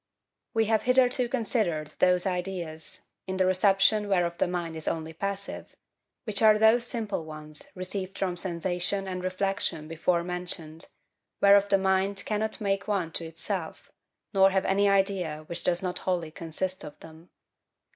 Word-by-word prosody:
We 225 0 +3
have 220 0 +2
hitherto 250 -1 +3
considered 205 - -1
those 180 -1 +4
ideas, 180 -4 -4 0.3
in 190 0 -3
the 185 - +3
reception 195 +3 +3
whereof 175 -3 +1
the - - +2
mind 175 -2 -3
is 160 - -6
only 160 0 -2
passive, 200 +3 -5 0.5
which 215 -3 -2
are 215 -1 +7
those 225 +2 +5
simple 215 -8 -2
ones 155 -1 -8
received 185 +1 -5
from 185 -2 -1
sensation 180 +2 -2
and 185 -1 -4
reflection 185 -4 -2
before 170 +2 0
mentioned, 175 -3 -4 0.5
whereof 200 0 +6
the 195 - +5
mind 195 +1 0
cannot 215 +1 -1
make 200 -1 -1
one 190 -6 -1
to 165 - -4
itself, 165 +1 -5 0.4
nor 195 -1 +6
have 190 0 0
any 200 +1 +3
idea 190 -6 +1
which 170 +2 -6
does 180 +1 +1
not 180 -1 -2
wholly 175 -4 -2
consist 170 +4 -4
of 150 - -10
them. 160 +2 -14
185 Hz, 155 wpm, -28 LUFS, 170-200 Hz, 0.5 s, are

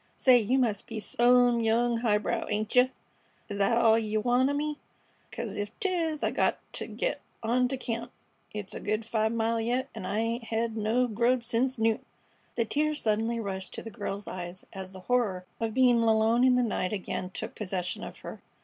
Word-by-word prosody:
"Say, 255 -2 +6
you 235 +4 +1
must 225 -6 0
be 225 -2 -5
some 245 +2 +4
young 230 +1 +2
highbrow, 225 0 0
ain't 215 +2 -1
yeh? 250 +1 +7 0.6
Is 200 -1 -4
thet 200 +4 +3
all 225 -1 +5
yeh 215 -1 -1
want 245 +4 +3
o' - - 0
me? 300 +1 -2 0.5
'Cause - - -5
ef 205 0 -2
'tis 335 -6 0
I - - +2
got - - +1 0.2
t' - - -4
git - - -2 0.2
on 250 +3 +2
t' 265 +1 -3
camp. 235 0 -4 0.4
It's 205 -2 -6
a - - -5
good 215 +2 -2
five 220 -1 +1
mile 230 0 0
yet, 250 +4 -1
an' 185 - -6
I 205 - -1
'ain't 230 +1 -1
hed 225 0 -1
no 225 +3 +2
grub 240 +2 +1
sence 245 +3 +1
noon." 225 +1 +1 0.5
The 230 - +1
tears 300 +5 0
suddenly 225 +2 0
rushed 190 -3 -5
to - - -6
the 225 - -7
girl's 200 -2 -5
eyes 180 0 -6
as 190 -1 -7
the 190 -1 -11
horror 200 -5 0
of 225 -1 -2
being 250 -3 +5
alone 225 +1 +3
in 255 -1 +5
the 250 - +3
night 210 -4 -1
again 185 -2 -3
took - - -6
possession 185 -3 -4
of - - -8
her. - - -7
230 Hz, 200 wpm, -29 LUFS, 210-245 Hz, 0.6 s, yeh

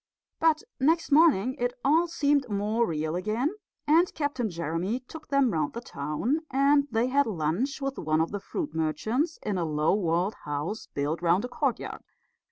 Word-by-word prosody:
But 320 -1 +3 0.2
next 320 +4 +2
morning 280 - +5
it 245 0 0
all 320 +5 +4
seemed 285 -5 +1
more 210 +3 0
real 155 0 -2
again, 215 - 0 0.3
and 330 +4 +4
Captain 285 -6 -1
Jeremy 170 +7 -2
took 315 +5 -11
them 275 -4 +3
round 155 -2 -1
the 235 - -4
town; 175 - -2
and 280 +2 +3
they 225 0 +1
had 280 +2 +2
lunch 215 - -1
with 275 -1 -3
one 155 -1 +1
of 160 - 0
the 205 - -3
fruit 310 - -4
merchants 220 - -1
in 200 -3 -1
a - - 0
low 155 -1 +1
walled 180 0 +1
house 150 +9 -4
built 145 +4 -2
round 175 +6 +2
a - - -6
courtyard. 275 -1 -2
230 Hz, 175 wpm, -27 LUFS, 170-280 Hz, 0.3 s, morning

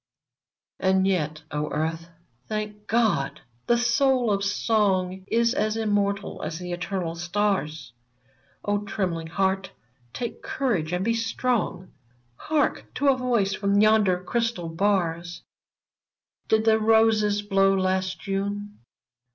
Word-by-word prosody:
And 190 0 +3
yet 155 -5 -1
— - - -38
O 150 +1 -2
Earth, 160 +2 -2 0.4
thank 210 -1 -5
God! 215 -12 +1
— 120 +1 -39
the 240 - +4
soul 245 0 +2
of 200 0 0
song 195 -3 +1
Is 235 +2 +2
as 215 -5 0
immortal 205 -2 -1
as 160 - -4
the 180 0 -6
eternal 175 -1 -3
stars! 170 -6 -2 0.7
O 205 0 +1
trembling 180 -5 -2
heart! 190 +2 0 0.4
take 240 - -5
courage 210 - -1
and 180 +2 -1
be 230 - +2
strong. 230 -4 -1 0.4
Hark! 305 - -1
to 285 - +2
a 270 - +5
voice 240 -6 +1
from 200 +1 +1
yonder 210 -4 +4
crystal 230 -5 -1
bars: 170 -2 -1 0.5
" - - -56
Did 220 0 +3
the 220 0 +4
roses 215 -2 +3
blow 195 -1 +3
last 185 -1 0
'Ju7ie 200 +1 -3
200 Hz, 130 wpm, -25 LUFS, 180-220 Hz, 0.7 s, a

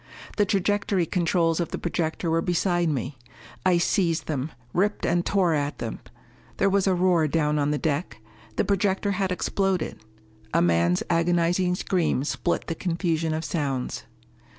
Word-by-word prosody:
The 205 - +4
trajectory 200 -1 +1
controls 165 -2 +1
of 170 - -1
the - - -4
projector 165 -1 -2
were 165 0 +2
beside 175 -1 +1
me. 135 -2 -3 0.4
I 185 -2 +4
seized 170 -1 +1
them, 145 0 -3 0.2
ripped 205 +3 +1
and 175 0 +2
tore 185 -4 +2
at 145 -1 -1
them. 115 - -5 0.6
There 195 - +2
was 200 0 +2
a 190 - +3
roar 175 -3 +3
down 150 -1 +1
on 145 0 +1
the 150 - +1
deck. 150 -3 -2 0.4
The - - +1
projector 200 0 +1
had 190 -1 -1
exploded. 190 0 -1 0.5
A - - +5
man's 85 +1 +2
agonizing 175 +1 +2
scream 175 -8 0
split 170 +3 -1
the - - -2
confusion 165 -1 -1
of 160 0 -3
sounds. 140 -7 -2
170 Hz, 155 wpm, -25 LUFS, 155-185 Hz, 0.6 s, A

